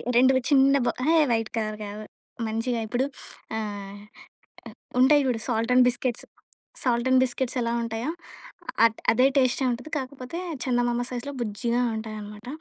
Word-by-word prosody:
2 260 +2 +6 0.2
చిన్నబ్ 275 -2 +4
ఎహే! 320 +5 +3
White 225 -1 0
colour 215 -1 -2
గాదు. 210 +1 -7 0.4
మంచిగా 230 +2 -1
ఇప్పుడు 245 +5 0 0.5
ఆహ్, 205 -2 -5 1.0
ఉంటాయి 285 +3 +6
చూడు. 245 -3 0
Salt 230 -1 0
and 250 0 +7
biscuits, 245 0 -3 0.6
salt 240 -1 +1
and 260 0 +6
biscuits 255 0 -3
ఎలా 235 0 -1
ఉంటాయో! 230 +5 -3 0.7
అ - - +9
ట్ - - -15
అదే 255 +3 +5
టేస్టే 260 0 +2
ఉంటుది. 250 +6 -5
కాకపోతే, 260 +3 -6 0.3
చందమామ 245 -1 +1
సైజ్‌లో 250 +3 -4
బుజ్జిగా 235 +2 -1
ఉంటాయనమాట. 215 0 -7
240 Hz, 140 wpm, -26 LUFS, 225-260 Hz, 1.0 s, అ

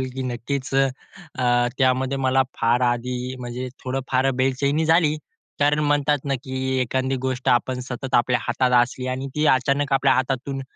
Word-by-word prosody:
आवडेल, 130 - -2
की 130 - -3
नक्कीच 130 +2 -4 0.7
अ, 120 -1 +2
त्यामध्ये 130 0 +2
मला 130 0 +3
फार 120 +2 +2
आधी 125 +1 -1
म्हणजे 125 +1 -5 0.2
थोडं 130 +1 -2
फार 130 +1 +2
बेचैनी 140 +4 +1
झाली. 160 -1 +3 0.4
कारण 145 +1 +3
म्हणतात 145 0 +2
ना, 140 - 0
की 130 -1 -2
एखादी 130 +2 -1
गोष्ट 130 0 -3
आपण 125 +1 +1
सतत 130 +1 -6
आपल्या 125 +1 +3
हातात 125 +1 0
असली 125 +1 -4
आणि 130 +1 -3
ती 150 +1 +1
अचानक 135 +1 +2
आपल्या 135 0 +4
हातातून 135 +1 -2
130 Hz, 160 wpm, -23 LUFS, 125-135 Hz, 0.7 s, आपल्या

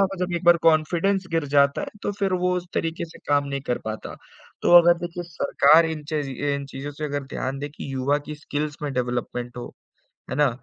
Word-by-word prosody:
होगा 195 0 +1
जब 180 - -5
एक 170 - -5
बार 175 0 +7
कॉन्फिडेंस 170 +4 +2
गिर 165 -2 +1
जाता 140 0 +4
है - - -4 0.2
तो 205 - -1
फिर 195 -2 0
वो 180 - +2
उस 180 0 -4
तरीके 165 0 -1
से 165 - -13
काम 145 0 +3
नहीं 140 0 -3
कर 125 - 0
पाता, 110 0 -5 0.5
तो 175 - +7
अगर 170 0 +4
देखिए 175 0 -5
सरकार 155 0 +4
इन 160 -2 -4
चज़ी 150 -4 -2 0.2
इन 140 0 -4
चीज़ों 135 +1 -6
से 150 +2 -6
अगर 145 -1 -3
ध्यान 135 0 -4
दे 145 +1 -4
कि 140 -2 -8
युवा 135 +2 +1
की 150 - -5
स्किल्स 150 0 -4
में 145 -2 -2
डेवलपमेंट 120 -1 -3
हो, 120 - -7 0.6
है 130 - -3
ना? 150 -2 +4
150 Hz, 220 wpm, -24 LUFS, 140-170 Hz, 0.6 s, बार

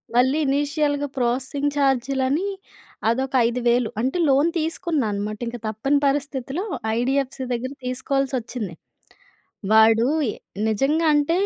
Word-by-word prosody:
మళ్ళీ 260 +4 +4
ఇనీషియల్‌గా 290 +1 0
ప్రాసెసింగ్ 260 +4 0
చార్జ్‌‌‌‌‌‌‌‌లని 270 +4 +1 0.6
అదొక 265 +3 -1
5000 245 +1 -2
వేలు 240 -1 +2
అంత 260 +7 -1
లోన్ 280 +5 +4
తీసుకున్నా 320 -4 -1
అన్నమాట. 210 +1 -3
ఇంక 240 +1 -4
తప్పని 270 +7 +1
పరిస్థితిలో 275 +3 -2 0.3
ఐడీఎఫ్‌సీ 265 +1 -1
దగ్గర 255 +3 -3
తీసుకోవాల్సి 265 +2 -1
వచ్చింది. 225 -5 -6 1.0
వాడు 225 +2 +6 0.6
నిజంగా 285 +9 +1
అంత 295 +2 +2
265 Hz, 110 wpm, -23 LUFS, 240-285 Hz, 1.0 s, వాడు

